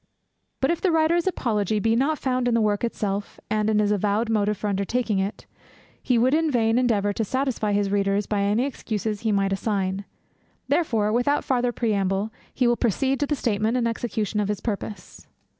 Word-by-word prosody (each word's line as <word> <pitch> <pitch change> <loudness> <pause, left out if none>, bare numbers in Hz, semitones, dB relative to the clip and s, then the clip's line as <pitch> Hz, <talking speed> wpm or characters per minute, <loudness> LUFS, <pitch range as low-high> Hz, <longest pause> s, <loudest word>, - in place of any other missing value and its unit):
But 265 - +3
if 340 - -2
the 380 - +2
writer's 325 +2 +2
apology 215 - 0
be 225 +2 +2
not 285 +6 +1
found 255 -2 0
in 240 - +2
the - - +3
work 210 -1 +1
itself, 205 -3 -3
and 215 0 +1
in 215 - +2
his 210 -1 +2
avowed 210 +3 +1
motive 210 -1 +1
for 210 - -3
undertaking 205 +2 0
it, 195 +2 -3 0.6
he 250 -3 +1
would 250 +4 +3
in 320 0 +2
vain 230 -3 +2
endeavour 205 -5 +1
to 225 - -1
satisfy 250 -3 -1
his 200 -1 +1
readers 200 0 +1
by 205 -1 -1
any 205 +5 +2
excuses 215 -6 -3
he 225 -2 0
might 195 -1 +1
assign; 195 -1 -1 0.6
therefore, 225 -11 +1
without 245 +5 +1
farther 250 -2 +1
preamble, 205 -2 -1 0.2
he 255 - 0
will 240 0 +3
proceed 260 +4 0
to 290 - 0
the 295 - 0
statement 225 -1 0
and 235 -2 +1
execution 220 -2 -2
of 205 - 0
his 210 -1 -2
purpose. 210 -1 -6
220 Hz, 190 wpm, -24 LUFS, 205-250 Hz, 0.6 s, But